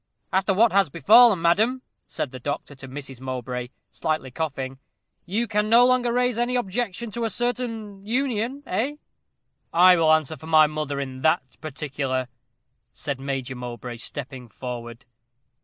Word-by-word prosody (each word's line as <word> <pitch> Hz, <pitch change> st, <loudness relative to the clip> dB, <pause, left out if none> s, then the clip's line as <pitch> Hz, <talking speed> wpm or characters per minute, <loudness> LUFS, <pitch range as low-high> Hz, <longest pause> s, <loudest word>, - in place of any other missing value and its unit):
"After 190 Hz, +2 st, +2 dB
what 220 Hz, +4 st, +4 dB
has 195 Hz, -3 st, +3 dB
befallen, 205 Hz, -, +6 dB
madam," 220 Hz, +10 st, +2 dB, 0.2 s
said 140 Hz, -, -4 dB
the 130 Hz, -, -8 dB
doctor 145 Hz, +2 st, -4 dB
to 135 Hz, -1 st, -11 dB
Mrs. 135 Hz, -1 st, -8 dB
Mowbray, 125 Hz, -1 st, -4 dB, 0.2 s
slightly 155 Hz, -5 st, -2 dB
coughing, 135 Hz, -3 st, -4 dB, 0.5 s
"you 220 Hz, +6 st, 0 dB
can 210 Hz, 0 st, 0 dB
no 235 Hz, +2 st, +7 dB
longer 250 Hz, -1 st, +3 dB
raise 245 Hz, -1 st, +1 dB
any 245 Hz, +1 st, +1 dB
objection 235 Hz, 0 st, -2 dB
to 235 Hz, +2 st, -3 dB
a 225 Hz, -, 0 dB
certain 225 Hz, -4 st, -3 dB
union, 250 Hz, +3 st, -1 dB
eh?" 245 Hz, +10 st, -1 dB, 0.8 s
"I 180 Hz, +2 st, +7 dB
will 160 Hz, -1 st, +4 dB
answer 155 Hz, -1 st, +2 dB
for 160 Hz, -, -12 dB
my 155 Hz, -1 st, +6 dB
mother 150 Hz, -2 st, -3 dB
in 130 Hz, -2 st, -5 dB
that 155 Hz, -3 st, +3 dB, 0.2 s
particular," 135 Hz, -4 st, -3 dB, 0.6 s
said 140 Hz, +1 st, -4 dB
Major 135 Hz, -2 st, -3 dB
Mowbray, 125 Hz, -1 st, -7 dB
stepping 130 Hz, 0 st, -7 dB
forward. 120 Hz, 0 st, -7 dB
160 Hz, 150 wpm, -24 LUFS, -, 0.8 s, no